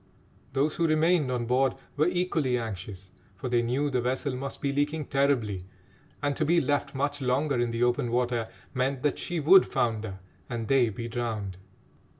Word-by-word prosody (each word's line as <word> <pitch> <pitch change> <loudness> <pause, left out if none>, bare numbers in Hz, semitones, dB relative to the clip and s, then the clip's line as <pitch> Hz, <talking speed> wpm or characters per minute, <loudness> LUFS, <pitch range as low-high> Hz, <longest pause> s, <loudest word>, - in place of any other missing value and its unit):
Those 145 +3 +1
who 170 - +2
remained 155 -1 +3
on 120 -2 -1
board 130 +2 +2 0.2
were 150 +3 +3
equally 170 -8 +1
anxious, 95 -4 -6 0.2
for 125 +7 -5
they 120 -1 +3
knew 125 +5 0
the 125 -2 +1
vessel 130 +2 -1
must 135 +1 -5
be 140 -1 -1
leaking 145 +2 0
terribly, 130 -10 +1 0.6
and 145 -1 +1
to - - +1
be 170 +3 +4
left 145 -3 -1
much 145 +1 -1
longer 135 +1 +1
in 120 0 +1
the 115 +1 0
open 120 0 +1
water 120 -2 0 0.2
meant 130 +1 -1
that 145 - +1
she 175 -1 -2
would 180 +6 +7
founder 110 -4 -1 0.3
and 115 -2 -3
they 130 -2 +4
be 115 +3 -5
drowned. 110 -5 -3
130 Hz, 175 wpm, -28 LUFS, 120-145 Hz, 0.6 s, would